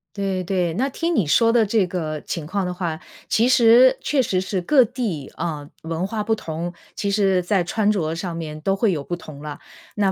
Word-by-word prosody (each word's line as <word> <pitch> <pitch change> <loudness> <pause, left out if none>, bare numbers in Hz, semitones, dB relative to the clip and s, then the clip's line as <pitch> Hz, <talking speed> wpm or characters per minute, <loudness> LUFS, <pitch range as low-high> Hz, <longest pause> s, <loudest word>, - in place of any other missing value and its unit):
对 195 -2 -1
对， 180 -2 0
那 260 +9 0
听 330 +5 -1
你 200 - +2
说 230 +10 +4
的 235 -2 +4
这 205 -3 +2
个 155 -4 -3
情 160 0 -5
况 195 +3 -2
的 180 - -3
话， 170 -3 -3 0.3
其 230 +3 +3
实 255 +1 +6
确 280 -3 +1
实 185 -6 0
是 190 0 -2
各 255 +9 +5
地， 215 - -4
呃， 150 -3 -4
文 165 +2 -2
化 215 +2 -3
不 220 +1 +1
同， 170 -3 -5 0.2
其 205 -1 -1
实 195 -2 +2
在 180 +1 +1
穿 205 +4 0
着 165 -7 0
上 170 0 -4
面 155 -2 -6
都 195 +5 0
会 200 +1 +2
有 155 -5 -2
不 175 - -3
同 155 -4 -11
了。 150 -1 -7 0.4
哪 200 -2 +2
190 Hz, 230 characters per minute, -22 LUFS, 165-220 Hz, 0.4 s, 实